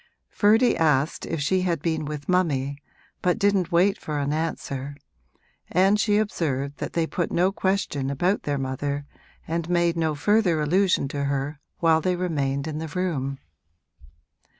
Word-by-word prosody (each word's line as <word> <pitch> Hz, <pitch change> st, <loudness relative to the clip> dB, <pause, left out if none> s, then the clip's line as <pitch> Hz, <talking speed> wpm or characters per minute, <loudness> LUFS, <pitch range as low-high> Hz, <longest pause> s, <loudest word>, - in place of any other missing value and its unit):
Ferdy 225 Hz, +4 st, +4 dB
asked 150 Hz, -2 st, +1 dB
if 165 Hz, -, -2 dB
she 185 Hz, +6 st, +1 dB
had 175 Hz, -3 st, 0 dB
been 160 Hz, 0 st, -1 dB
with 145 Hz, -1 st, -6 dB
mummy, 145 Hz, -6 st, 0 dB, 0.4 s
but 180 Hz, +3 st, +2 dB
didn't 200 Hz, -4 st, +2 dB
wait 195 Hz, +4 st, +3 dB
for 150 Hz, -1 st, -4 dB
an 145 Hz, 0 st, -1 dB
answer, 145 Hz, -3 st, -3 dB, 0.8 s
and 195 Hz, +4 st, +4 dB
she 210 Hz, -1 st, +3 dB
observed 145 Hz, -9 st, -1 dB
that -, -, -5 dB
they 165 Hz, -1 st, +1 dB
put 175 Hz, +1 st, -2 dB
no 180 Hz, +3 st, +2 dB
question 185 Hz, -9 st, -1 dB
about 175 Hz, +9 st, +1 dB
their 145 Hz, -1 st, -2 dB
mother 140 Hz, +2 st, -3 dB, 0.4 s
and 165 Hz, +1 st, -2 dB
made 170 Hz, -1 st, +2 dB
no 160 Hz, -2 st, 0 dB
further 185 Hz, +1 st, +2 dB
allusion 175 Hz, 0 st, +2 dB
to 140 Hz, 0 st, -2 dB
her 140 Hz, +1 st, -2 dB, 0.2 s
while 160 Hz, -1 st, +4 dB
they 180 Hz, +2 st, +1 dB
remained 140 Hz, -6 st, -1 dB
in 155 Hz, -1 st, -4 dB
the 160 Hz, -, -4 dB
room. 145 Hz, -5 st, -2 dB
160 Hz, 155 wpm, -25 LUFS, 145-185 Hz, 0.8 s, Ferdy